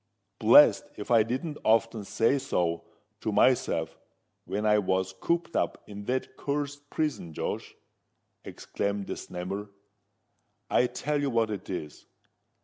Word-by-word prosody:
"Blest - - +7
if 105 - -6
I 115 -2 +7
didn't 130 +8 -3
often 115 -1 +2
say 115 +7 +2
so 90 -11 -1 0.3
to - - -2
myself - - +2 0.5
when 105 +2 -2
I 105 0 +5
was 95 -1 0
cooped 170 - -1
up - - -1
in 100 0 -9
that 130 +2 -2
cursed 145 0 -3
prison, 150 - -2
Josh!" - - -4 0.7
exclaimed 100 0 -3
the - - -4
Snammer. 95 +3 -6 1.0
"I 125 - +4
tell 145 +4 -2
you 140 - 0
what 115 -3 +1
it 100 -3 -6
is. 75 -6 -6
110 Hz, 135 wpm, -28 LUFS, 100-140 Hz, 1.0 s, Blest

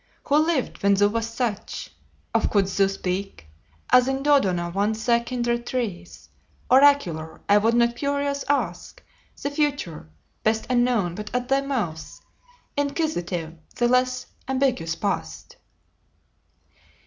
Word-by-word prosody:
Who 285 - +1
lived 310 -3 0
when 200 -1 +4
thou 205 +1 +4
wast 230 +1 -3
such? 235 -5 -3 0.4
Of - - +2
couldst 195 -2 +1
thou 195 - +5
speak, 195 - -4 0.5
As 250 0 +6
in 270 0 -1
Dodona 190 -13 +2
once 215 +3 -1
thy 235 -1 +4
kindred 240 0 -2
trees 200 -9 -4 0.4
Oracular, 255 - +4
I 205 +1 +6
would 225 +3 +2
not 235 0 +3
curious 280 +1 -1
ask 225 -12 -2 0.4
The 285 - -3
future, 285 - -2 0.3
best 220 0 +1
unknown, 240 -8 +2
but 210 +3 -6
at 250 +1 -2
thy 270 0 +3
mouth 210 - -4 0.6
Inquisitive, 235 - -2 0.2
the 240 - +2
less 255 +1 +1 0.2
ambiguous 260 -11 0
past." 80 - -4
235 Hz, 125 wpm, -24 LUFS, 195-270 Hz, 0.6 s, As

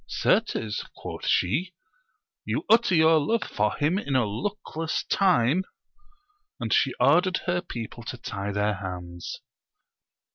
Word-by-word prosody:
Certes, 110 -2 0
quoth - - -7
she, 165 - +1 0.7
you - - -2
utter 225 -5 +5
your 160 0 +5
love 225 +10 0
for 105 0 -1
him 160 +7 +1
in 140 -9 -3
a 125 -3 +3
luckless 160 - -3
time; 180 -4 +3 1.0
and - - -1
she - - +2
ordered 185 +1 +3
her 175 -1 0
people 120 - -7
to 125 - -5
tie 100 -3 -4
their 105 +1 +1
hands. 90 -3 -7
140 Hz, 130 wpm, -26 LUFS, -, 1.0 s, utter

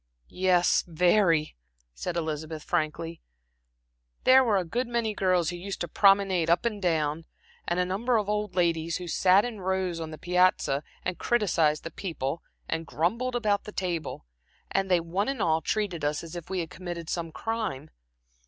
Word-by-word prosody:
"Yes, 180 -1 +3
very," 170 -1 +3 0.4
said - - -4
Elizabeth, 155 -1 -3
frankly. 165 0 -2 1.0
"There 260 +1 +7
were 220 -5 +2
a 185 - 0
good 240 +9 -2
many 235 -2 -1
girls 180 -4 +1
who 175 - -6
used 195 +3 -5
to 175 - -1
promenade 195 -2 +4
up 170 +7 +3
and 215 -3 -1
down, 160 -3 0 0.4
and 175 +1 0
a 180 - +2
number 225 +7 +1
of 210 -2 -1
old 210 -2 -2
ladies 170 -2 +1
who 180 - -7
sat 185 +4 +4
in 225 -5 -6
rows 185 -2 -1
on 160 -1 -5
the 155 - -8
piazza 180 -4 +2 0.2
and 180 0 -2
criticized 165 -10 +2
the 165 - -6
people 160 -4 -4 0.3
and 165 0 -3
grumbled 225 - -1
about 210 -4 +1
the 210 - -7
table; 175 -5 -3 0.5
and 195 0 0
they 180 -2 +4
one 180 +7 -1
and 275 -3 -3
all 160 -4 +2
treated 185 -3 -2
us 145 +2 -1
as 165 +1 -9
if 170 -2 -7
we 190 -2 -1
had 160 -3 -7
committed 175 -2 -6
some 165 -1 -3
crime. 215 -10 -3
180 Hz, 175 wpm, -27 LUFS, 165-200 Hz, 1.0 s, There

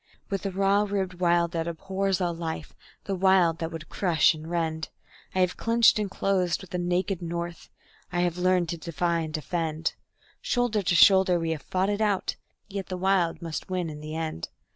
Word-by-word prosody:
With 195 -2 -1
the 195 - -3
raw 195 +2 +3
ribbed 190 -3 -2
Wild 170 -1 +3
that 165 -1 -2
abhors 190 +3 -1
all 175 -2 0
life, 165 -1 -5 0.3
the 200 - -3
Wild 185 -3 +3
that 165 0 -3
would 160 -2 -7
crush 175 -4 +3
and 155 +1 -9
rend, 160 -2 -2 0.5
I 185 - +3
have 180 0 +1
clinched 230 -1 +4
and 205 -2 -1
closed 190 -2 0
with 190 - -12
the 180 - -2
naked 180 +1 0
North, 170 0 -5 0.4
I 175 0 0
have 175 0 0
learned 180 -2 +2
to 170 - -2
defy 170 +1 -1
and 160 -1 -3
defend; 160 0 -2 0.5
Shoulder 245 -4 +1
to 175 -2 +1
shoulder 190 +1 +6
we 165 -1 -1
have 155 -3 -3
fought 190 +2 0
it 205 +1 -2
out 205 -3 +1 0.3
yet 195 -2 -5
the 185 - -4
Wild 180 -2 +1
must 165 +1 -5
win 180 -3 -2
in 150 - -8
the 155 +1 -6
end. 160 - -4
175 Hz, 195 wpm, -27 LUFS, 165-190 Hz, 0.5 s, shoulder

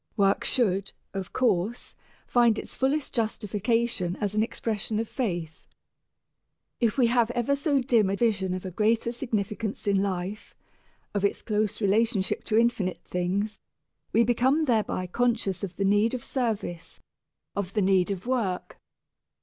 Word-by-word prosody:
Work 195 -1 +3
should, 200 -6 +1 0.2
of 195 -2 -5
course, 230 -2 0 0.3
find 235 -3 +4
its - - -6
fullest 275 +2 0
justification 220 -3 0
as 205 -1 -1
an 215 - +2
expression 220 -1 -2
of 225 +1 -1
faith. 175 - -4 1.1
If 230 -1 +1
we 255 - +5
have 235 -1 +3
ever 245 +4 +1
so 280 -1 +1
dim 235 -6 +3
a 195 - 0
vision 200 -5 +1
of 185 - -6
a 185 - -4
greater 225 +5 +1
significance 220 -4 -3
in 200 -1 +3
life, 195 +1 -4 0.6
of 205 -1 -1
its 200 - 0
close 215 0 -1
relationship 205 0 +1
to 220 - +1
infinite 225 -6 +1
things, 195 +4 -2 0.5
we 230 - +4
become 260 +6 +2
thereby 220 -7 0
conscious 215 -2 0
of 185 -3 -4
the 195 - 0
need 205 +5 +3
of 245 - -6
service, 220 -9 -3 0.6
of 195 -2 -3
the 210 - +3
need 190 -1 +3
of 195 0 -4
work. 230 -8 -2
215 Hz, 150 wpm, -27 LUFS, 195-235 Hz, 1.1 s, we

